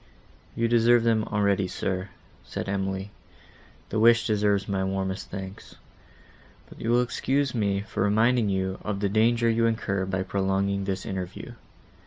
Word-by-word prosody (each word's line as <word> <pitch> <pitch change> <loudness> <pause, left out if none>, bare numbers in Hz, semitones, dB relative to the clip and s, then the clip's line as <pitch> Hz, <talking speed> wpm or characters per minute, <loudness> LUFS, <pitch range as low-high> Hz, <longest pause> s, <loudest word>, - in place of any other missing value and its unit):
"You 115 - +1
deserve 120 0 +4
them 110 -2 +2
already, 100 -2 +1
sir," 95 +1 -3 0.3
said - - -5
Emily; 95 0 -2 0.8
"the 110 - -1
wish 115 +1 +5
deserves 105 -2 +1
my 95 -1 -1
warmest 95 0 -3
thanks. 95 0 -8 0.9
But - - -14
you 115 - -2
will 120 +1 +4
excuse 135 +2 -1
me 100 -4 0
for 105 - -5
reminding 110 +3 +3
you 95 -1 -1
of 105 -2 -3
the 100 -1 0
danger 115 +3 +3
you 115 0 +3
incur 100 -4 -1
by 95 0 -1
prolonging 95 +1 0
this 95 -1 -3
interview. 95 -1 -5
100 Hz, 150 wpm, -26 LUFS, 95-115 Hz, 0.9 s, wish